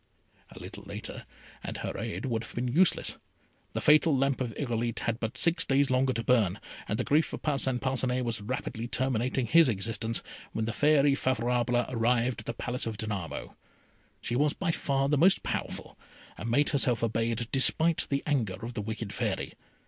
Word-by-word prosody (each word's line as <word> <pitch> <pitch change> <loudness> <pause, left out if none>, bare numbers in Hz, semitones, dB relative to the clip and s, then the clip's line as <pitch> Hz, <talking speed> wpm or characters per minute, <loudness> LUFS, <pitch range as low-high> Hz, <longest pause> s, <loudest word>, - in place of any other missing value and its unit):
A - - -14
little - - -9
later, - - -7 0.4
and - - -5
her - - -4
aid 90 +8 -4
would 115 -3 -1
have 110 - -11
been 125 +1 -1
useless. 165 +9 +2 0.6
The - - -2
fatal 150 -1 +5
lamp 135 0 +1
of 120 -3 -1
Irolite 120 -4 -2
had 115 0 -1
but 110 -1 -3
six 170 0 +3
days 135 0 +2
longer 130 +1 +3
to 115 - -2
burn, 110 -7 +2 0.3
and - - -1
the - - 0
grief 155 +3 +2
of - - -6
Parcin 135 -4 +1
Parcinet 130 -1 0
was 115 -2 -2
rapidly 115 0 -4
terminating 130 0 0
his 160 +4 +6
existence, 110 +1 -1 0.3
when 110 - -1
the 115 - -2
Fairy 145 0 +4
Favourable 120 -2 +1
arrived 120 +1 +1
at - - -9
the 120 - -2
Palace 120 +1 -3
of 110 -2 -4
Danamo. 100 -5 -5 0.7
She 120 - -2
was 145 +3 +2
by 185 -3 -1
far 135 -3 0
the 145 0 +2
most 190 +5 +5
powerful, - - -4 0.4
and 110 - -5
made 145 +5 +3
herself 125 -5 +1
obeyed 115 0 0
despite 160 +4 +3
the 140 0 0
anger 120 -11 0
of 120 - -6
the 110 - -3
wicked 110 0 -5
Fairy. - - -2
125 Hz, 185 wpm, -29 LUFS, 115-140 Hz, 0.7 s, his